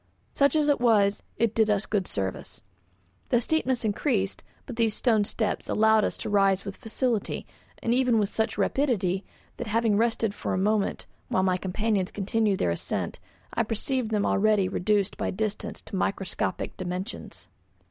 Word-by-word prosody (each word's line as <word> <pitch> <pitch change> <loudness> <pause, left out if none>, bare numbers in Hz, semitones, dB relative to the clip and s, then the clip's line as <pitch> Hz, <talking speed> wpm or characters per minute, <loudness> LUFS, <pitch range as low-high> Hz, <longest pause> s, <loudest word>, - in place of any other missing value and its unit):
Such 280 +2 +3
as 300 -1 +3
it 290 - +3
was, 205 -4 +3 0.2
it 230 -2 +1
did 220 -1 +3
us 210 0 +1
good 200 -3 -1
service. 95 -2 -4 0.7
The 240 - +4
steepness 260 -3 0
increased, 205 -2 0 0.2
but 250 - -7
these 225 -2 +1
stone 220 -5 +2
steps 220 0 -2
allowed 220 0 +4
us - - -1
to - - -5
rise 195 -2 +3
with 195 - -5
facility, 225 -1 -1 0.4
and 230 - +2
even 250 -2 +3
with 210 -2 +2
such 220 - -1
rapidity 200 -9 +1 0.3
that, 240 - -5
having 225 0 +2
rested 225 -2 +1
for - - -3
a - - -1
moment 205 +2 0 0.2
while 185 - +1
my 185 -1 +2
companions 195 +1 -1
continued 210 0 0
their 85 - +1
ascent, 85 - -3 0.3
I - - +1
perceived 230 +2 -1
them 210 -2 +1
already 205 -1 +3
reduced 200 +2 0
by - - -1
distance 210 +1 -3
to 205 - -7
microscopic 195 0 -2
dimensions. 185 +4 -6
215 Hz, 165 wpm, -27 LUFS, 195-230 Hz, 0.7 s, The